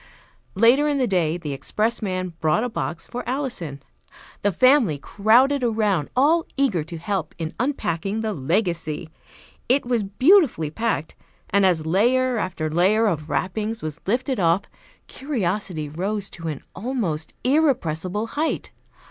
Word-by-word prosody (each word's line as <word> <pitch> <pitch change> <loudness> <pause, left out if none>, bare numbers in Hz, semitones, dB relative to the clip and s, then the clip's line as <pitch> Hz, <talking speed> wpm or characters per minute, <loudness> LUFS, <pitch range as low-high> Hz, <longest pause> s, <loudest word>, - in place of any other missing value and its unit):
Later 240 +8 +5
in 290 -1 +1
the 260 - +2
day 175 -6 +1
the 155 -5 -5
expressman 185 - -2
brought 160 +7 +2
a 245 - -1
box 170 -6 -4
for 245 - -6
Alison. 245 - -3 0.6
The 205 - +2
family 255 - +4
crowded 245 - +3
around, 210 -9 +1
all 315 +6 +3
eager 215 - +1
to 165 +2 -8
help 175 -1 -3
in 165 -1 -4
unpacking 215 - -1
the 220 -1 -2
legacy. 165 0 -1 0.6
It 265 +2 +3
was 240 -2 +1
beautifully 225 - +3
packed, 225 -5 -2 0.4
and 200 0 +4
as 165 -4 +1
layer 240 +8 +2
after 175 -6 -2
layer 185 +8 +3
of 160 -7 -1
wrappings 215 +4 -2
was 155 0 -5
lifted 255 +4 0
off, 170 +2 +3 0.4
curiosity 195 - -3
rose 195 +6 -3
to 165 -2 -7
an 150 -3 -4
almost 190 -10 -3
irrepressible 215 - +1
height. 300 +7 -2
200 Hz, 140 wpm, -23 LUFS, 165-245 Hz, 0.6 s, Later